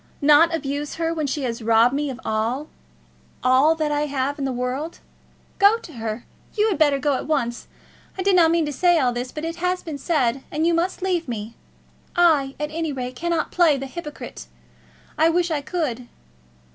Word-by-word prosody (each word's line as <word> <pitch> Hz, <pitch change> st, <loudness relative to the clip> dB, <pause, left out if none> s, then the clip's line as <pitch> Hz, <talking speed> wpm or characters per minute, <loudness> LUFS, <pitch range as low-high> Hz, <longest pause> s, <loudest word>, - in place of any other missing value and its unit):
Not 300 Hz, +3 st, +6 dB
abuse 290 Hz, -2 st, -3 dB
her 330 Hz, 0 st, -1 dB
when 310 Hz, -3 st, -2 dB
she 280 Hz, +1 st, -2 dB
has 235 Hz, -2 st, -3 dB
robbed 230 Hz, +2 st, +4 dB
me 290 Hz, +1 st, -1 dB
of 255 Hz, -2 st, -6 dB
all 230 Hz, +7 st, -1 dB, 0.7 s
all 255 Hz, +3 st, +5 dB
all 320 Hz, -, +4 dB
that 310 Hz, -2 st, -1 dB
I 295 Hz, 0 st, 0 dB
have 280 Hz, +1 st, -2 dB
in 275 Hz, -, -1 dB
the 265 Hz, -, -1 dB
world! 255 Hz, +6 st, -3 dB, 0.6 s
Go 405 Hz, +3 st, +6 dB
to 350 Hz, -8 st, -12 dB
her. 225 Hz, -1 st, -5 dB, 0.3 s
You 430 Hz, 0 st, +3 dB
had 380 Hz, -, -2 dB
better 290 Hz, -3 st, +4 dB
go 280 Hz, +1 st, +1 dB
at -, -, -6 dB
once. 240 Hz, -6 st, -1 dB, 0.5 s
I 375 Hz, -, -2 dB
did 390 Hz, 0 st, +3 dB
not 335 Hz, -3 st, +6 dB
mean 335 Hz, -1 st, +2 dB
to 295 Hz, -, -4 dB
say 350 Hz, +5 st, +3 dB
all 255 Hz, -5 st, +2 dB
this, 245 Hz, +1 st, -4 dB
but 305 Hz, +1 st, -5 dB
it 330 Hz, +1 st, -4 dB
has 360 Hz, +1 st, -1 dB
been 305 Hz, -4 st, -6 dB
said, 270 Hz, -5 st, 0 dB
and 310 Hz, +2 st, -1 dB
you 340 Hz, -, +3 dB
must 355 Hz, +2 st, -1 dB
leave 355 Hz, -4 st, 0 dB
me. 225 Hz, -1 st, -5 dB, 0.6 s
I, 310 Hz, -6 st, +3 dB
at 300 Hz, 0 st, -3 dB
any 325 Hz, -1 st, -2 dB
rate, 255 Hz, -2 st, -5 dB
cannot 335 Hz, +2 st, -1 dB
play 330 Hz, -5 st, +4 dB
the 270 Hz, -, -5 dB
hypocrite; 300 Hz, +2 st, -8 dB, 0.7 s
I 320 Hz, +1 st, +5 dB
wish 345 Hz, 0 st, +1 dB
I 300 Hz, -2 st, 0 dB
could." 280 Hz, -7 st, -3 dB
295 Hz, 205 wpm, -23 LUFS, 260-335 Hz, 0.7 s, Not